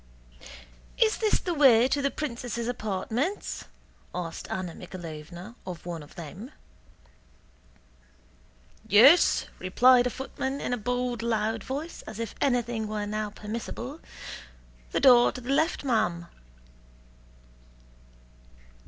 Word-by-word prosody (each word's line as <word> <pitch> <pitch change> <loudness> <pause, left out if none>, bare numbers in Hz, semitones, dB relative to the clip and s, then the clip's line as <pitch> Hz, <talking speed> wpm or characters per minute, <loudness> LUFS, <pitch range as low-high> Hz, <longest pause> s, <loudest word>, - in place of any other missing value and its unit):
"Is 440 -2 +3
this 435 -2 +2
the 355 - -2
way 255 -6 +6
to 285 +2 0
the 275 - +2
princesses' 240 -5 -4
apartments?" 235 - -2 0.5
asked 170 -2 -5
Anna 180 -3 -3
Mikháylovna 175 +2 -9
of 180 -3 -8
one 170 -2 -5
of 145 - -14
them. 180 - -8 2.4
"Yes," 255 +12 +6
replied 245 +7 +5
a - - 0
footman 265 +2 -4
in - - -2
a - - +2
bold 245 +1 -2
loud 225 -2 -1
voice, 295 +6 -5
as 220 - -7
if 230 -2 -4
anything 240 -4 0
were 210 -1 -3
now 215 0 -2
permissible; 230 +7 -6 0.9
"the - - +1
door 245 -2 +7
to - - -6
the 250 +2 -4
left, 315 +3 +1
ma'am." 215 -10 0
235 Hz, 115 wpm, -27 LUFS, 205-260 Hz, 2.4 s, door